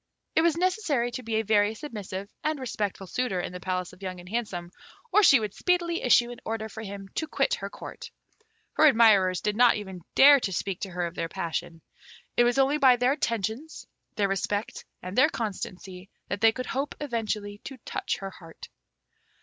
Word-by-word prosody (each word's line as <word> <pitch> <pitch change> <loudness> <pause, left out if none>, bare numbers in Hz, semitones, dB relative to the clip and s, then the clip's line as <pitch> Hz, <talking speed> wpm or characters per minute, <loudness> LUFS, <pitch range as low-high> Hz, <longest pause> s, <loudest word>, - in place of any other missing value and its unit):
It 320 - +5
was 335 -1 +2
necessary 345 - 0
to 240 - -5
be 225 -2 -3
a 220 - +2
very 210 0 +2
submissive 205 -7 -6 0.2
and 310 -1 -1
respectful 205 -6 -3
suitor 195 0 -2
in 175 - -4
the 180 - -6
palace 185 -1 -3
of 185 - -17
Young 185 -2 -5
and 175 - -12
Handsome, 190 -5 -4 0.4
or 420 - +6
she 280 - +7
would 210 -2 -4
speedily 345 -2 0
issue 240 -1 +4
an 240 - -9
order 220 0 -3
for 220 - -8
him 200 -2 -7
to 315 - -3
quit 485 - 0
her 485 - -3
Court. - - -9 0.6
Her 310 - +6
admirers 210 -8 +5
did 210 0 -1
not 245 +1 +5
even 190 -4 -7
dare 280 +1 +8
to 205 - -2
speak 185 +1 -3
to 195 - -4
her 175 -1 -2
of 170 - -5
their 165 -1 -3
passion. 170 -2 -4 0.5
It 240 - +5
was 245 +2 +2
only 275 +2 +3
by 260 -3 +7
their 250 +2 +2
attentions, 235 +2 -3 0.3
their 205 -2 +2
respect, 205 +2 -2 0.2
and 185 +2 -6
their 260 - +5
constancy, 190 -3 -6 0.2
that 200 +1 -3
they 225 0 +6
could 255 +2 -5
hope 275 +2 -3
eventually 215 -6 -3
to 270 - -7
touch - - -2
her 195 -1 -6
heart. 165 -3 -13
220 Hz, 200 wpm, -27 LUFS, 190-260 Hz, 0.6 s, dare